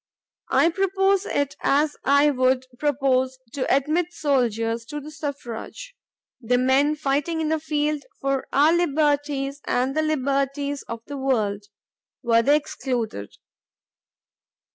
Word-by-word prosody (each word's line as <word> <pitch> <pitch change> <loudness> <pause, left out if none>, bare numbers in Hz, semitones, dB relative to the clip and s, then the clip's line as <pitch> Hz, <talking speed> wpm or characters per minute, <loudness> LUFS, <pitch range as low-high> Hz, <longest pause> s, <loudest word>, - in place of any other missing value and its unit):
I 335 - +4
propose 390 +1 +1
it 285 -1 -1
as 295 +2 +2
I 280 +2 +4
would 255 -1 +1
propose 260 -3 +1 0.2
to 275 - -1
admit 310 +6 +1
soldiers 230 -7 0
to 295 +5 -6
the 300 +1 -10
suffrage, 290 - -7 0.5
the 245 +1 +1
men 265 +4 +3
fighting 295 +3 -1
in 315 -1 -1
the 320 0 +1
field 300 -1 -1 0.2
for 275 -1 -1
our 295 +4 +4
liberties 290 -4 0
and 260 +3 0
the 310 - +2
liberties 280 -1 -1
of 230 0 -6
the 285 - -6
world, 215 -7 0 0.6
were 230 -1 +4
they 285 +5 +4
excluded. 245 - -3
280 Hz, 125 wpm, -24 LUFS, 260-300 Hz, 0.6 s, I